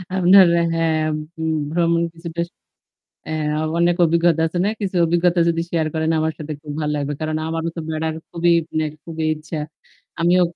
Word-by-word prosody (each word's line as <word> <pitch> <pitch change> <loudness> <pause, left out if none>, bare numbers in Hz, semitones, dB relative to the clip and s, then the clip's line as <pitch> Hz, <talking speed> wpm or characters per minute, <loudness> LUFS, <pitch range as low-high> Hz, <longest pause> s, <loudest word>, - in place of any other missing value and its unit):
আপনার 190 +1 +7 0.3
হ্যাঁ, 165 -1 +1 0.4
উ - - -2 0.3
ভ্রমণ 170 0 +2
কিছুটা 170 0 -5 0.9
এ্যা 155 -1 -1 0.2
অনেক 170 0 +3
অভিজ্ঞতা 170 0 +3
আছে 165 +2 -3
না? - - +2
কিছু 195 -2 -2
অভিজ্ঞতা 175 +1 +2
যদি 165 0 +1
শেয়ার 160 -2 0
করেন 160 0 0
আমার 160 0 0
সাথে 155 0 -5
খুব 150 -2 -7
ভালো 150 -1 -1
লাগবে। 145 0 -2
কারণ 155 0 -1
আমারও 165 +1 -2
তো - - -3
বেড়ার 160 0 -2 0.2
খুবই 170 0 +2 0.2
মানে 155 0 0 0.2
খুবই 160 -1 -4
ইচ্ছা। 155 +1 -7 0.6
আমিও 175 +2 +4
165 Hz, 165 wpm, -21 LUFS, 155-170 Hz, 0.9 s, আপনার